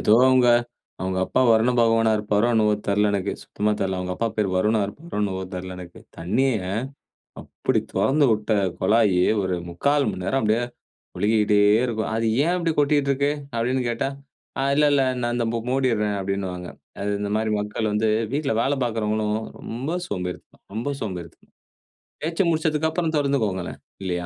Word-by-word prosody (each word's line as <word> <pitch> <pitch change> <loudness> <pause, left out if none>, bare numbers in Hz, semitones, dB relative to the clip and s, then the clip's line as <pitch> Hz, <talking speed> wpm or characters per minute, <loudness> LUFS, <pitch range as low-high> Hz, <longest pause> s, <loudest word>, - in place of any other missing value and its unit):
ஏதோ 105 - +4
அவுங்க, 130 -2 +5 0.5
"அவுங்க 95 0 -2
அப்பா - - +1
வருண 115 +2 +4
பகவானா 115 -1 +3
இருப்பாரோ?" 105 +2 +1
என்னவோ? 105 -1 +3
தெரில 105 +1 +2
எனக்கு 100 0 -1
சுத்தமா 105 +1 -2
தெரியல. 95 -1 -1
அவங்க 90 0 -3
அப்பா 115 - 0
பேரு 105 -3 +1
"வருணா" 110 +3 +2
இருக்குமோ 150 +11 -9
என்னவோ 95 -2 -1
தெரில 90 0 -6
எனக்கு. 85 -1 -11 0.2
தண்ணிய 110 +11 +1 0.9
அப்டி - - -1
தொறந்து 145 +2 +3
விட்ட 105 0 0 0.3
கொழாயி, 105 -2 +3 0.2
ஒரு 95 -1 -1
3/4 140 +12 +1
மணி 90 - -6
நேரம் 135 +8 +1
அப்டியே 110 +3 +2 0.6
ஒழுகிக்கிட்டே 105 0 +2 0.3
இருக்கும். 110 -2 -2
"அது 115 0 0 0.2
ஏன் 175 - +2
அப்டி 165 -2 0
கொட்டிட்டு 145 -1 +2
இருக்கு?" 140 +1 +1 0.2
அப்டின்னு 125 +3 0
கேட்டா 120 +3 -1 0.5
"ஆ - - +1
இல்ல, 150 +1 +4
இல்ல 140 - +4 0.2
நான் 120 0 -1
இந்த 120 - 0 0.2
மூடிர்றேன்" 115 -6 +1
அப்டின்னுவாங்க. 95 -2 -3 0.3
அது 105 - -1
இந்த 100 0 -2
மாரி 110 0 -1
மக்கள் 105 +1 -2
வந்து 110 +1 +1 0.2
வீட்ல 145 -1 0
வேல 135 +4 +1
பார்க்கறவங்களும் 110 -2 -1 0.2
ரொம்ப 130 +9 -4
சோம்பேறிதனம், 90 - -6
ரொம்ப 115 +6 -2
சோம்பேறிதனம். 90 -6 -7 0.7
தேச்சு 165 +4 0
முடிச்சதுக்கு 160 -1 +1
அப்புறம் 165 -1 -1
தொறந்துக்கோங்களேன் 115 -11 -1 0.2
இல்லையா? 90 -2 -2
110 Hz, 155 wpm, -23 LUFS, 100-130 Hz, 0.9 s, அவுங்க